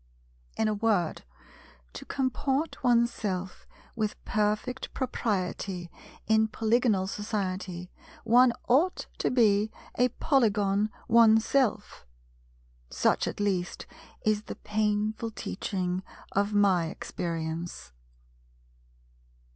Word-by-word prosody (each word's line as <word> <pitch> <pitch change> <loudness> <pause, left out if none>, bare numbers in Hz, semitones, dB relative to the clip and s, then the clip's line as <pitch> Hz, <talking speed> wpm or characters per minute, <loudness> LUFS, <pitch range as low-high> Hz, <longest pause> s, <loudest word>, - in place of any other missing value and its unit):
In 220 - +2
a 215 - +1
word, 205 -6 0 0.7
to - - -8
comport 270 +3 -1
oneself 225 -6 0 0.3
with 215 -2 -1
perfect 215 +4 -1
propriety 190 -7 -2 0.3
in 220 0 +3
Polygonal 220 -2 +1
society, 190 -3 -4 0.3
one 245 +2 +6 0.2
ought 305 +9 +2
to - - +1
be 215 -3 +3 0.2
a 250 +1 +2
Polygon 210 -7 +2 0.2
oneself. 225 - +3 0.8
Such - - +1
at - - -5
least 190 -4 -1 0.4
is 215 0 +1
the - - -6
painful 210 +1 -1
teaching 185 -4 -3 0.3
of 200 +1 +1
my 195 -5 +3
experience. 165 - -5
210 Hz, 90 wpm, -28 LUFS, 190-230 Hz, 0.8 s, one